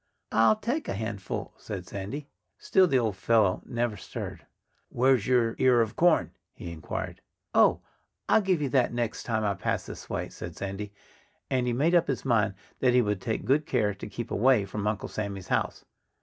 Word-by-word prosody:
"I'll 115 Hz, -, +5 dB
take 245 Hz, +8 st, -2 dB
a -, -, -2 dB
handful," 100 Hz, -2 st, -4 dB
said 95 Hz, -4 st, -6 dB
Sandy. 105 Hz, +11 st, -6 dB, 0.3 s
Still 190 Hz, -1 st, +4 dB
the 135 Hz, -, +3 dB
old 110 Hz, -5 st, 0 dB
fellow 105 Hz, -1 st, +2 dB
never 120 Hz, -2 st, -1 dB
stirred. -, -, -7 dB, 0.4 s
"Where's 125 Hz, -3 st, +3 dB
your 120 Hz, -3 st, +3 dB
ear 125 Hz, -2 st, +5 dB
of 110 Hz, -2 st, -1 dB
corn?" 175 Hz, -1 st, +3 dB, 0.2 s
he 85 Hz, -, -7 dB
inquired. 80 Hz, -2 st, -5 dB, 0.3 s
"Oh! -, -, +5 dB, 0.5 s
I'll -, -, +5 dB
give 185 Hz, -6 st, +1 dB
you 140 Hz, -, 0 dB
that 130 Hz, -2 st, +3 dB
the -, -, -8 dB
next 120 Hz, -2 st, -2 dB
time 110 Hz, -2 st, 0 dB
I 100 Hz, -1 st, +1 dB
pass 95 Hz, -, -2 dB
this -, -, -9 dB
way," -, -, -3 dB
said -, -, -8 dB
Sandy. 100 Hz, +1 st, -5 dB, 0.6 s
And 130 Hz, -2 st, +1 dB
he 120 Hz, -, +1 dB
made 150 Hz, +8 st, +2 dB
up 170 Hz, -1 st, +4 dB
his 135 Hz, -1 st, -2 dB
mind 110 Hz, -5 st, +2 dB, 0.2 s
that 125 Hz, -1 st, +3 dB
he 125 Hz, -, +5 dB
would 105 Hz, -3 st, -1 dB
take 110 Hz, -3 st, -2 dB
good 145 Hz, +4 st, +2 dB
care 105 Hz, -5 st, +1 dB
to 100 Hz, -, -8 dB
keep -, -, -6 dB
away 120 Hz, -2 st, +4 dB
from 105 Hz, +2 st, -3 dB
Uncle 105 Hz, 0 st, -1 dB
Sammy's 100 Hz, -3 st, -5 dB
house. -, -, -1 dB
115 Hz, 190 wpm, -28 LUFS, 105-130 Hz, 0.6 s, I'll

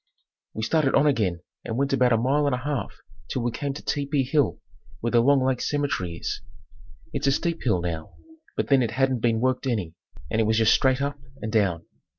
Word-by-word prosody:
We 110 Hz, -, -3 dB
started 145 Hz, +3 st, +2 dB
on 140 Hz, -, +4 dB
again 105 Hz, -, +1 dB, 0.2 s
and 115 Hz, -, -4 dB
went 140 Hz, +1 st, 0 dB
about 125 Hz, -2 st, +3 dB
a 115 Hz, -, +4 dB
mile 140 Hz, +5 st, +2 dB
and 135 Hz, -, +2 dB
a 125 Hz, -, -6 dB
half 140 Hz, -9 st, -2 dB, 0.4 s
till 125 Hz, -, -2 dB
we 120 Hz, -, 0 dB
came 140 Hz, +4 st, -3 dB
to -, -, -8 dB
Tepee 140 Hz, -1 st, 0 dB
hill 145 Hz, +2 st, +1 dB, 0.4 s
where 115 Hz, -, -2 dB
the 120 Hz, -, +5 dB
Long 135 Hz, +1 st, +4 dB
Lake 130 Hz, -2 st, 0 dB
cemetery 140 Hz, -, -1 dB
is. -, -, -4 dB, 0.7 s
It's -, -, -1 dB
a -, -, +5 dB
steep 170 Hz, +4 st, -1 dB
hill 100 Hz, -8 st, +1 dB
now, 80 Hz, -2 st, -5 dB, 0.4 s
but -, -, -1 dB
then 135 Hz, -2 st, +5 dB
it 120 Hz, -, +1 dB
hadn't 130 Hz, +2 st, +1 dB
been 115 Hz, -1 st, +1 dB
worked 130 Hz, +1 st, 0 dB
any 105 Hz, -10 st, -1 dB, 0.4 s
and 110 Hz, -, +2 dB
it -, -, +2 dB
was 110 Hz, +1 st, +2 dB
just 110 Hz, -1 st, +5 dB
straight 130 Hz, 0 st, +2 dB
up 145 Hz, 0 st, -3 dB, 0.2 s
and 110 Hz, -, -3 dB
down. 95 Hz, -7 st, +1 dB
125 Hz, 215 wpm, -25 LUFS, 110-140 Hz, 0.7 s, the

